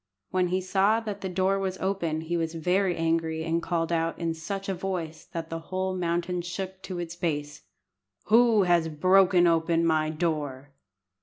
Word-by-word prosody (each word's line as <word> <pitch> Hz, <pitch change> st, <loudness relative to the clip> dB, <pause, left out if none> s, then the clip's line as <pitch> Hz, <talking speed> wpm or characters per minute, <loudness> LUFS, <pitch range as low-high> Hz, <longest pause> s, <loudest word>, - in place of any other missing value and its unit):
When 185 Hz, -1 st, +2 dB
he 185 Hz, +1 st, 0 dB
saw 195 Hz, +4 st, +2 dB
that 205 Hz, -3 st, -5 dB
the 190 Hz, -, -3 dB
door 190 Hz, +2 st, +1 dB
was 190 Hz, -1 st, -2 dB
open 175 Hz, -5 st, -1 dB
he 165 Hz, +2 st, -3 dB
was 165 Hz, -1 st, -2 dB
very 180 Hz, +3 st, +1 dB
angry, 165 Hz, -1 st, 0 dB
and 165 Hz, +1 st, 0 dB
called 170 Hz, -1 st, -1 dB
out, 165 Hz, 0 st, 0 dB
in 165 Hz, -1 st, -1 dB
such 195 Hz, +5 st, -5 dB
a 195 Hz, -, 0 dB
voice 175 Hz, -4 st, -4 dB
that 165 Hz, -1 st, -6 dB
the 165 Hz, -, -3 dB
whole 185 Hz, 0 st, -1 dB
mountain 175 Hz, 0 st, -1 dB
shook 190 Hz, +2 st, -6 dB
to 185 Hz, -2 st, -6 dB
its 170 Hz, -1 st, -5 dB
base, 145 Hz, -4 st, -3 dB, 0.6 s
"Who 225 Hz, -2 st, +5 dB
has 175 Hz, -2 st, +3 dB
broken 185 Hz, +3 st, +4 dB
open 165 Hz, 0 st, +2 dB
my 155 Hz, -1 st, +2 dB
door?" 150 Hz, -4 st, -3 dB
175 Hz, 175 wpm, -27 LUFS, 165-190 Hz, 0.6 s, Who